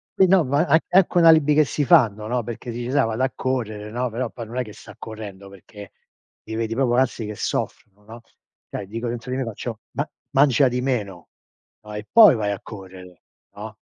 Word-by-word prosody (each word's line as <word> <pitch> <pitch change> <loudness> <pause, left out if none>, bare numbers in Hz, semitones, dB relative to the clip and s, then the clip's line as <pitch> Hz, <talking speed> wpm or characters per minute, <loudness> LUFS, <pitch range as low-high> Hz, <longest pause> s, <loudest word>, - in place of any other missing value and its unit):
che, 190 - +5
no, 185 -3 +4
ma 140 +4 +2
an 155 0 +5
anche 185 -1 +3
un 170 - +5
alibi 155 -2 +6
che 155 - +5
si 145 - -2
fanno, 115 - +4
no, 125 +2 -1
perché 120 +1 -7
dici: 120 +1 -5
“Sai, 140 -4 +3
vado 115 +3 -2
a 130 - 0
correre!”, 110 -5 -3
no, 125 +2 -2
però 115 +1 -3
poi 115 0 -8
non 115 +3 -10
è 125 - 0
che 110 - -11
sta - - -14
correndo, 100 -3 -9
perché 100 +1 -13 0.5
li 110 - -7
vedi 115 0 -2
proprio, 120 0 +1
anzi, 125 -3 0
che 105 0 -6
soffrono, 105 0 -4
no, 115 +2 -12 0.5
cioè, 100 - -6
dico, 115 +4 -4
dentro 120 +1 -6
di - - -1
me 135 - -1
faccio: 115 0 -6
“Ma - - -3 0.2
mangia 135 -1 +4
di 125 +1 -2
meno, 105 -9 -3 0.6
no? 105 0 -10
E 105 0 -7
poi 220 - +8
vai 105 -2 -1
a 100 - -4
correre, 95 -4 -12 0.3
no?”. 105 +1 -8
115 Hz, 215 wpm, -22 LUFS, 105-130 Hz, 0.6 s, poi